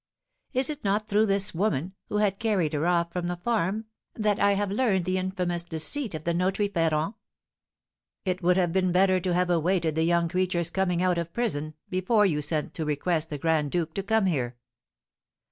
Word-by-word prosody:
Is 260 +3 +2
it 300 0 -8
not 205 +1 0
through 210 +2 +3
this 195 0 0
woman, 175 -2 -1 0.2
who 210 - -1
had 205 -2 +1
carried 200 -9 +1
her 155 +3 0
off 170 -1 +1
from 180 -1 -2
the 175 - -2
farm, 215 +2 -1 0.3
that 210 -2 +1
I 200 - +4
have 200 0 -1
learned 200 -5 +1
the 185 +1 0
infamous 180 -2 -2
deceit 175 - -1
of 155 - -6
the 170 - 0
notary, 190 +4 0
Ferrand?" 165 0 0 1.1
"It 185 -1 -1
would 180 +1 +3
have 175 -3 +1
been 185 -1 +2
better 185 +1 +4
to 180 0 -1
have 180 0 +1
awaited 170 -1 +1
the 160 - 0
young 170 0 +2
creature's 175 -1 0
coming 180 -2 0
out 180 -2 +2
of 170 0 -4
prison, 155 -11 -2
before 195 +4 +2
you 150 -6 +1
sent 150 0 0
to 160 - -3
request 155 +2 -1
the 150 - -4
Grand 155 0 +1
Duke 165 0 -2
to 195 - -2
come 220 +1 +1
here." 125 -9 -1
180 Hz, 195 wpm, -27 LUFS, 165-200 Hz, 1.1 s, I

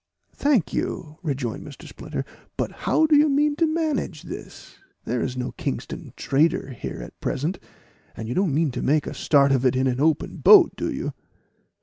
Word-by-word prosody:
"Thank 275 - +1
you," 155 -2 -3
rejoined 135 -8 -3
Mr. 145 - -11
Splinter; - - -6 0.3
"but - - -1
how 315 - +1
do 310 -1 +4
you 295 +1 +5
mean 290 +1 +2
to 330 - +3
manage 315 -1 -2
this? - - -10 0.3
There 125 -1 -1
is 130 -1 -3
no 125 - -3
Kingston - - -5
trader 145 -1 +1
here 120 - -6
at - - -12
present, 155 +8 -2 0.6
and 110 - -5
you 120 - -2
don't 185 0 +1
mean 150 +1 +1
to 125 - -4
make 150 +2 +2
a - - -5
start 140 -2 +3
of 130 -2 +2
it 130 -1 +3
in 130 +1 +1
an 130 0 0
open 155 0 +1
boat, 395 -5 +7
do - - -2
you?" - - -4
150 Hz, 190 wpm, -24 LUFS, -, 0.6 s, boat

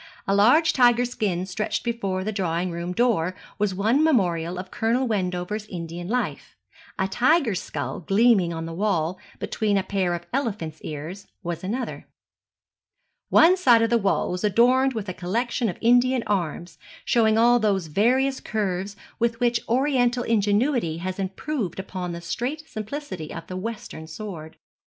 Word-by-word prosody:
A 195 - +2
large 245 +12 +5
tiger 245 -1 +4
skin 195 -7 -2
stretched 195 +3 -2
before 200 -6 -2
the 215 - -2
drawing 180 -3 -1
room 170 +1 -4
door 185 -5 +1 0.2
was 205 -2 0
one 225 +10 +2
memorial 180 - +1
of 185 +1 -7
Colonel 235 +4 +1
Wendover's 195 0 -2
Indian 170 -1 -6
life; 245 +4 -3 0.4
a 190 - +1
tiger's 245 - +2
skull 145 -2 -4
gleaming 195 -1 +3
on 165 -1 -4
the 165 - -6
wall, 180 -2 0 0.2
between 210 -3 0
a 195 - +1
pair 190 -2 0
of 175 0 -7
elephant's 200 - -3
ears, 160 +6 -7 0.2
was 175 0 -4
another. 235 +7 -4 1.2
One 340 +3 +6
side 245 -11 +5
of 230 - 0
the 235 - +4
wall 195 -2 +1
was 180 +2 -4
adorned 250 +6 +4
with 215 -3 -4
a 185 - -3
collection 230 +6 -1
of 175 - -5
Indian 245 +1 +4
arms, 175 -5 -2 0.3
showing 220 -2 +3
all 240 +1 +5
those 200 -5 +1
various 255 - +2
curves 200 -2 -2 0.2
with 235 0 0
which 240 -1 +2
oriental 250 -1 +2
ingenuity 210 - +1
has 185 +3 -4
improved 195 - -3
upon 185 -2 -5
the 170 0 -6
straight 250 - -4
simplicity 215 - -6
of 165 - -7
the 185 - -7
western 185 -5 -6
sword. 160 -2 -8
205 Hz, 155 wpm, -24 LUFS, 180-240 Hz, 1.2 s, One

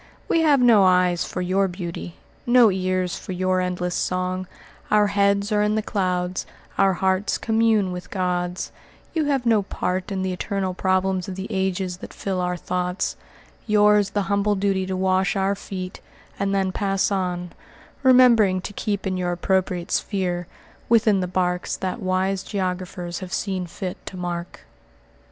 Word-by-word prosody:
We 330 - +2
have 295 -4 +4
no 235 -4 +6
eyes 180 -1 +3
for 180 - -4
your 190 +2 +2
beauty; 175 -2 -6 0.3
no 240 -3 +6
ears 185 -1 -1
for 185 - -6
your 185 0 +1
endless 180 -1 -2
song; 185 0 -1 0.4
our 210 0 +4
heads 200 +1 +2
are 210 0 +3
in 210 +1 +2
the 220 - 0
clouds, 180 -3 -1 0.3
our 195 -1 +4
hearts 190 +2 +1
commune 220 -3 +2
with 180 0 -7
gods; 180 -1 -2 0.4
you 320 -2 +1
have 275 -4 0
no 225 -3 +4
part 185 -1 -3
in 190 -1 -2
the 185 -1 -1
eternal 190 0 -2
problems 185 0 0
of 185 - -5
the 190 +1 -5
ages 190 -2 -1
that - - -10
fill 190 -2 -2
our 180 0 -1
thoughts, 180 +1 -2 0.5
yours 210 -1 +4
the 205 0 -1
humble 200 +1 +1
duty 190 -1 0
to 190 -1 -2
wash 190 +1 +1
our 195 0 +1
feet, 185 -2 -7 0.4
and 200 0 0
then 195 -1 +1
pass 195 +1 0
on, 180 -2 -2 0.5
remembering 245 -7 +6
to 205 - -7
keep 205 0 -2
in 185 -1 -1
your 180 -1 -1
appropriate 180 0 -1
sphere, 180 -3 -1 0.4
within 220 -3 +4
the 180 - -1
barks 180 0 -1
that 190 +5 -3
wise 185 0 0
geographers 180 -3 -3
have 185 -2 -8
seen 190 -3 -2
fit 180 +1 -6
to 185 - -6
mark." 175 -1 -5
190 Hz, 165 wpm, -23 LUFS, 180-200 Hz, 0.5 s, no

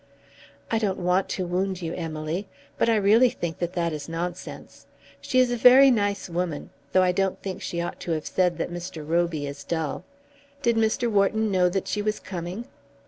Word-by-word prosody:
"I 225 - +2
don't 200 -4 0
want 180 +2 +1
to 185 - -2
wound 185 +1 -2
you, 165 0 -3
Emily, 165 +3 -4 0.3
but - - +3
I 225 - +4
really 215 +5 +5
think 170 -7 -5
that 175 0 -2
that 170 -2 -1
is 150 0 -6
nonsense. 175 +2 -6 0.3
She 255 - -1
is 255 -1 +4
a - - +1
very 255 +3 +8
nice 205 -4 0
woman; 170 -3 -3 0.2
though 185 - +4
I 180 - +3
don't 190 +1 0
think 190 -2 -5
she 170 - -3
ought 175 - -5
to 175 - -4
have 155 -1 -3
said 180 -3 +1
that 170 - -3
Mr. 175 -3 -6
Roby 165 -2 0
is 140 0 -7
dull. 160 -3 -3 0.6
Did 235 -2 +3
Mr. 225 +2 +1
Wharton 215 0 +2
know 180 -2 +3
that 190 +1 -2
she 210 - -1
was 210 +1 -1
coming?" 180 +5 -6
180 Hz, 195 wpm, -25 LUFS, 170-210 Hz, 0.6 s, very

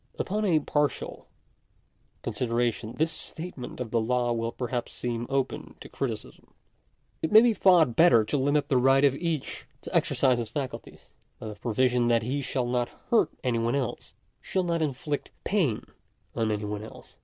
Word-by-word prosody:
§4. - - 0
Upon 210 +3 -1
a 170 -6 +4
partial 145 0 -1 1.0
consideration 120 -2 -1
this 160 +1 +1
statement 155 -5 -7
of 120 -3 -4
the 115 - +2
law 120 +1 +1
will 115 0 -2
perhaps 120 -1 -4
seem 120 -1 -3
open 135 -1 -2
to - - -10
criticism. - - -6 0.7
It 160 - -1
may 215 +1 +9
be 240 -1 +4
thought 175 - +4
better 130 -10 +6
to 110 - -2
limit 145 +1 +2
the 135 -4 +2
right 135 +2 +5
of 140 - +4
each 160 -1 -3
to - - -7
exercise 130 -3 +3
his 115 -2 -3
faculties, 135 +1 -6 0.3
by 110 - -7
the - - -6
pro 110 +2 -4
viso 125 0 +3
that 115 -1 +3
he 135 +5 -1
shall 130 -1 -1
not 120 0 0 0.2
hurt 235 - +4
any 120 -3 +1
one 115 +3 0
else—shall 140 +7 -4
not 170 -2 0
inflict 145 0 -2
pain 170 - 0 0.5
on 110 -1 0
any 105 -1 -1
one 105 0 -4
else. 110 - -12
130 Hz, 175 wpm, -27 LUFS, 120-150 Hz, 1.0 s, may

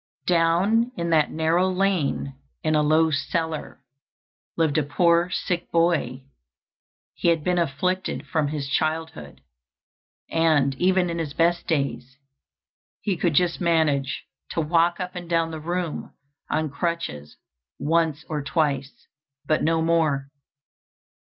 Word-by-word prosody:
"Down 180 +8 +3
in 170 -1 -2
that 155 -2 +4
narrow 165 +4 +1
lane, 185 -7 0 0.3
in 155 - +1
a 150 - +4
low 155 +2 +3
cellar, 155 -1 -3 0.7
lived 160 -2 +2
a - - +1
poor 170 +4 +2
sick 180 -1 -2
boy; 165 -7 +1 0.9
he - - -2
had 165 -2 +3
been 180 +1 +1
afflicted 175 +4 -1
from 155 -4 0
his 145 -1 -3
childhood, 155 - -2 0.9
and 155 -4 +2
even 185 -1 +3
in 170 - -3
his 155 -3 -4
best 170 +1 +1
days 140 -4 -2 0.8
he 200 - 0
could 165 -2 0
just 175 +3 +2
manage 155 -6 +1 0.3
to - - -3
walk 170 +2 +2
up 180 -1 -4
and 175 -2 -7
down 165 -1 +1
the 160 - -5
room 175 +1 -3 0.4
on 155 -2 -1
crutches 145 - -4 0.4
once 160 -1 0
or 150 -2 -2
twice, 140 -1 -1 0.4
but 155 - +1
no 160 +1 +2
more. 155 -5 +1
165 Hz, 130 wpm, -24 LUFS, 150-170 Hz, 0.9 s, that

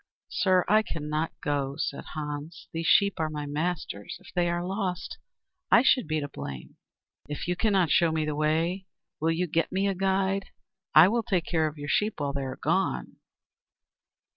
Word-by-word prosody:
"Sir, 185 -2 +3
I 215 +1 +5
cannot 155 -4 -3
go," 140 -3 -1
said 140 - -3
Hans. 150 +2 -6
"These 165 0 -2
sheep 200 -1 +4
are 160 -1 0
my 150 -1 -4
master's. 150 - -3
If - - -16
they 175 -1 +2
are 175 0 -1
lost, 185 -2 -3 0.5
I 240 - +6
should 255 - +4
be 155 0 0
to 145 - -3
blame." 70 - -8 0.5
"If 150 - -4
you 180 - +1
cannot 190 -4 +2
show 170 -2 +4
me 160 -1 0
the 150 - -1
way, 165 +5 0 0.3
will 160 +2 +1
you 165 +2 +1
get 165 0 0
me 195 +2 +1
a 195 - +1
guide? 195 +1 0 0.5
I 155 +3 +10
will 230 +4 +1
take 185 -6 0
care 160 -2 +1
of 150 0 -7
your 145 0 -6
sheep 210 +7 +1
while 140 -1 -1
you 140 - -1
are 130 -1 -4
gone." 60 -1 -1
165 Hz, 185 wpm, -27 LUFS, 150-185 Hz, 0.5 s, I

